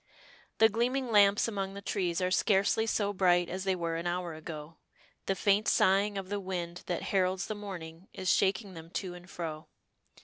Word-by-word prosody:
The 220 Hz, -, +7 dB
gleaming 240 Hz, +3 st, 0 dB
lamps 205 Hz, 0 st, +5 dB
among 195 Hz, -3 st, -3 dB
the -, -, -5 dB
trees 180 Hz, -3 st, -1 dB
are 180 Hz, 0 st, 0 dB
scarcely 200 Hz, +3 st, +2 dB
so 205 Hz, -2 st, 0 dB
bright 175 Hz, -2 st, +3 dB
as 185 Hz, +1 st, -4 dB
they 190 Hz, -1 st, +2 dB
were 165 Hz, -2 st, -2 dB
an 170 Hz, +1 st, -3 dB
hour 175 Hz, -1 st, -2 dB
ago, 155 Hz, 0 st, -8 dB, 0.5 s
the 195 Hz, -, +1 dB
faint 200 Hz, +2 st, +2 dB
sighing 200 Hz, +2 st, +3 dB
of 190 Hz, -1 st, -4 dB
the 205 Hz, 0 st, -2 dB
wind 175 Hz, -2 st, -4 dB
that 175 Hz, -, -2 dB
heralds 185 Hz, 0 st, +1 dB
the -, -, -3 dB
morning 180 Hz, -4 st, -8 dB
is 185 Hz, -, -6 dB
shaking 195 Hz, 0 st, +1 dB
them 165 Hz, -1 st, -10 dB
to 180 Hz, 0 st, -4 dB
and 180 Hz, +1 st, -12 dB
fro. 160 Hz, -3 st, -6 dB
190 Hz, 190 wpm, -30 LUFS, 175-200 Hz, 0.5 s, The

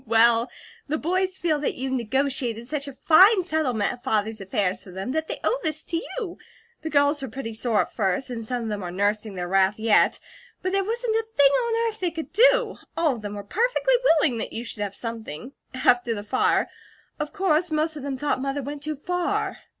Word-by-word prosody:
"Well, 230 Hz, +1 st, +5 dB, 0.4 s
the 305 Hz, +2 st, 0 dB
boys 370 Hz, +4 st, 0 dB
feel 315 Hz, -3 st, 0 dB
that 290 Hz, -, -1 dB
you 265 Hz, +1 st, -3 dB
negotiated 250 Hz, -1 st, -1 dB
such 285 Hz, +2 st, -3 dB
a 280 Hz, -, -7 dB
fine 375 Hz, +7 st, +6 dB
settlement 260 Hz, -11 st, 0 dB
of 245 Hz, -, -12 dB
Father's 220 Hz, -4 st, -1 dB
affairs 195 Hz, -1 st, -1 dB
for -, -, -14 dB
them, 190 Hz, +6 st, -5 dB
that 315 Hz, +2 st, -1 dB
they -, -, -4 dB
owe -, -, +1 dB
this 310 Hz, -1 st, -2 dB
to 335 Hz, -, -2 dB, 0.2 s
you. 420 Hz, -8 st, -5 dB, 0.4 s
The 320 Hz, -, -4 dB
girls 285 Hz, 0 st, +3 dB
were 270 Hz, -, -4 dB
pretty 230 Hz, -1 st, -6 dB
sore 220 Hz, -1 st, +1 dB
at -, -, -5 dB
first, 205 Hz, +5 st, -1 dB
and 230 Hz, -2 st, -4 dB
some 245 Hz, +1 st, -3 dB
of 225 Hz, -, -3 dB
them 205 Hz, -1 st, -3 dB
are 180 Hz, -, -4 dB
nursing 205 Hz, +3 st, -1 dB
their 175 Hz, -1 st, -3 dB
wrath 195 Hz, +2 st, +3 dB
yet; 220 Hz, -1 st, +3 dB, 0.4 s
but 370 Hz, -, 0 dB
there 390 Hz, 0 st, +2 dB
wasn't 455 Hz, +2 st, -1 dB
a 450 Hz, 0 st, -2 dB
thing 280 Hz, -1 st, +6 dB
on 460 Hz, -, +1 dB
earth 440 Hz, -1 st, -5 dB
they 360 Hz, -, 0 dB
could 325 Hz, -1 st, -7 dB
do. -, -, +4 dB, 0.2 s
All 310 Hz, -7 st, +2 dB
of -, -, -10 dB
them 205 Hz, 0 st, -5 dB
were 205 Hz, -, -6 dB
perfectly -, -, +1 dB
willing 305 Hz, -, +3 dB
that -, -, -4 dB
you 230 Hz, -, -4 dB
should 230 Hz, -3 st, -5 dB
have 200 Hz, -1 st, -3 dB
something 230 Hz, -, -6 dB, 0.2 s
after 245 Hz, -2 st, +3 dB
the 205 Hz, -, -5 dB
fire 210 Hz, -, +2 dB, 0.5 s
of 300 Hz, 0 st, -3 dB
course, 360 Hz, -4 st, +1 dB
most 310 Hz, 0 st, 0 dB
of 295 Hz, -, -6 dB
them 275 Hz, -1 st, -4 dB
thought 285 Hz, -1 st, -1 dB
Mother 275 Hz, +1 st, -2 dB
went 285 Hz, +2 st, -6 dB
too 305 Hz, +1 st, -3 dB
far." 355 Hz, +5 st, -2 dB
275 Hz, 220 wpm, -25 LUFS, 225-330 Hz, 0.5 s, fine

